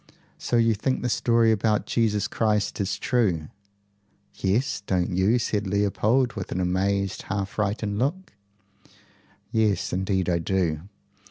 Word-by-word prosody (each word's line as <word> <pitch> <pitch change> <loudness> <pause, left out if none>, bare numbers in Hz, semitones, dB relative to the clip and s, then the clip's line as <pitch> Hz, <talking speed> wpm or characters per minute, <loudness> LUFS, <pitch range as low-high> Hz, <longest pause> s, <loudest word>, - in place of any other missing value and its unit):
"So 120 - 0
you 115 -1 +4
think 130 +6 -1
the 125 - 0
story 115 -1 +3
about 110 0 +1
Jesus 105 -3 +1
Christ 105 -1 0
is 95 - -1
true?" 95 - 0 0.8
"Yes. 105 +9 0
Don't 90 -1 0
you?" 100 +6 +3
said 105 -3 -1
Leopold 105 +5 +1
with 95 -3 -6
an - - -2
amazed, 95 +2 0
half 100 -2 -1
frightened 105 0 -2
look. 170 +9 -2 1.2
"Yes, 110 -4 +1
indeed 95 0 0
I 85 -2 +1
do. 85 -3 0
105 Hz, 135 wpm, -25 LUFS, 95-115 Hz, 1.2 s, you